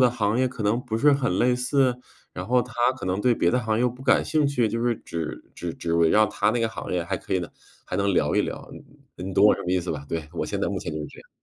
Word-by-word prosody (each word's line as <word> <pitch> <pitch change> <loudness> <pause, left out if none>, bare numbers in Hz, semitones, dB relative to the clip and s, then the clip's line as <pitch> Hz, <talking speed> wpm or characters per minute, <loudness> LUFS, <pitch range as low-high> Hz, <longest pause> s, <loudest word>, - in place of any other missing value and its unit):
的 125 -2 +5
行 110 -2 0
业 130 0 +2
可 125 -4 -6
能 110 +4 +2
不 110 -2 -2
是 145 +2 +5
很 125 -10 0
类 125 +1 +3
似？ 125 0 +1 0.4
然 90 0 -6
后 125 +1 +3
他 125 - -11 0.2
可 120 - -6
能 95 +1 0
对 125 0 +3
别 85 - +2
的 125 - +2
行 110 -1 0
业 - - 0
又 125 - +3
不 125 +2 -10
感 130 -1 +3
兴 155 -2 +1
趣， 125 -5 +1
就 115 +2 -2
是 120 -2 +1
只 80 -2 -6
只 85 -2 -5
只 85 -1 -2
围 85 -1 +4
绕 110 0 +5
他 105 +1 +1
那 120 - 0
个 115 - +1
行 - - -6
业 90 -1 0
还 95 +2 -2
可 95 - -7
以 - - +3
呢 85 -3 -5 0.4
还 90 - -4
能 100 0 +1
聊 - - +1
一 - - +4
聊。 - - -6
你 - - -9 0.4
你- 90 - -7
你 95 - -5
懂 100 - +5
我 - - +6
什 - - -7
么 90 - -3
意 95 - +3
思 90 - -4
吧？ 75 -2 -6
对， 80 -2 -3
我 85 - -2
现 - - -3
在 - - 0
目 - - -2
前 80 - -5
就 75 - -4
是 75 - -5
这 - - -14
样。 - - -25
110 Hz, 345 characters per minute, -25 LUFS, 90-125 Hz, 0.4 s, 我